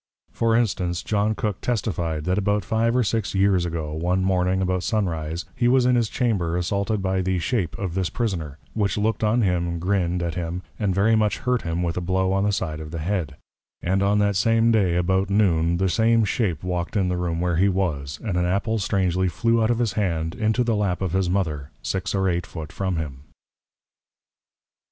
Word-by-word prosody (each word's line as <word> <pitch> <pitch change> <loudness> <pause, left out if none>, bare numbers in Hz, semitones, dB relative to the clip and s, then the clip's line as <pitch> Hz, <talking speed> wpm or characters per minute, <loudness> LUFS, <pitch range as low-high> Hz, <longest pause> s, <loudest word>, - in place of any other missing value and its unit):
For 115 -1 +1
Instance, 90 -7 0
John 105 +1 0
Cook 105 -2 -3
testifi'd, 85 -9 -2
That 90 +3 +1
about 105 +1 0
five 115 +1 +1
or 125 - +3
six 110 -1 -1
Years 95 -2 +3
ago, 80 -3 -4
one 90 +4 0
Morning, 95 0 +1
about 95 -1 0
Sun 110 +1 0
Rise, 80 0 -4
he 120 - +1
was 125 0 +4
in 125 - +4
his 115 -3 +1
Chamber 95 -9 0
assaulted 100 +3 -1
by 95 0 +1
the 95 0 0
Shape 90 0 -1
of 95 -4 -3
this 95 -1 -1
Prisoner: 85 - -3 0.2
which 100 -3 0
look'd 110 +1 0
on 110 +2 +3
him, 85 -2 0
grinn'd 90 -1 0
at 85 -1 -2
him, 90 +1 -4 0.2
and 100 -4 0
very 110 +3 +4
much 105 -1 +2
hurt 125 -1 0
him 85 +1 -2
with 85 0 -2
a - - 0
Blow 95 +1 +1
on 95 +1 +1
the 105 - +2
side 80 -6 -2
of 80 0 -7
the 85 - -5
Head: 80 -3 -2 0.5
and 95 +2 +1
that - - +2
on 100 +1 +3
the 100 0 +2
same 115 +4 +3
day, 95 -6 +2
about 95 +2 +1
Noon, 85 -5 +2
the 95 +1 +1
same 115 +3 +3
Shape 100 -6 -1
walked 90 +2 -2
in 95 -2 +2
the 90 - 0
Room 85 -2 -2
where 90 -1 0
he 95 +3 +4
was, 80 -8 -2
and 100 -6 -1
an 90 - +1
Apple 100 +5 0
strangely 95 -2 +1
flew 115 +6 +1
out 110 - +2
of 120 - +2
his 115 -4 0
Hand, 85 -6 -1
into 110 +3 +1
the 115 -2 +1
Lap 100 -3 0
of 90 - -1
his 95 -1 +1
Mother, 80 -7 -1
six 95 +1 -2
or 95 -1 +1
eight 90 0 -1
Foot 80 -3 -7
from 95 -2 -2
him. 75 -4 -5
95 Hz, 215 wpm, -23 LUFS, 85-105 Hz, 0.5 s, was